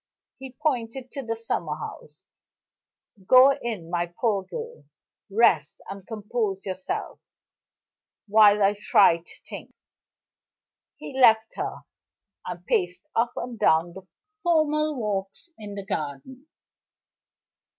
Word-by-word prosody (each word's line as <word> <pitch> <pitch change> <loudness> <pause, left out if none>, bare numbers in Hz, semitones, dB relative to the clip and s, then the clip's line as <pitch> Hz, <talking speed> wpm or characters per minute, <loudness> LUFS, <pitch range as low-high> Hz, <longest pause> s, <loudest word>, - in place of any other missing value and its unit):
He 265 -1 -9
pointed 255 -4 -2
to 275 - -5
the 230 -3 -3
summer 225 0 -3
house. - - -10 1.0
"Go 260 +2 +8
in, 220 -10 -5
my 175 -1 -1
poor 215 -5 +1
girl. 470 - -8 0.4
Rest, 190 -8 +3
and 195 -1 -9
compose 215 -3 -3
yourself, 185 -1 -4 1.1
while 210 -1 +6
I 200 +1 +3
try 195 -5 +5
to 170 - -15
think." - - -9 1.2
He - - -9
left 225 -4 +4
her, - - -4 0.7
and - - -7
paced 425 -7 0
up 235 +1 +1
and 240 -2 -6
down 165 +2 +3
the 190 0 -12 0.3
formal 310 -3 +2
walks 205 - -4
in 205 -2 -9
the 200 -1 -6
garden. 175 - -5
220 Hz, 115 wpm, -25 LUFS, 195-260 Hz, 1.2 s, Go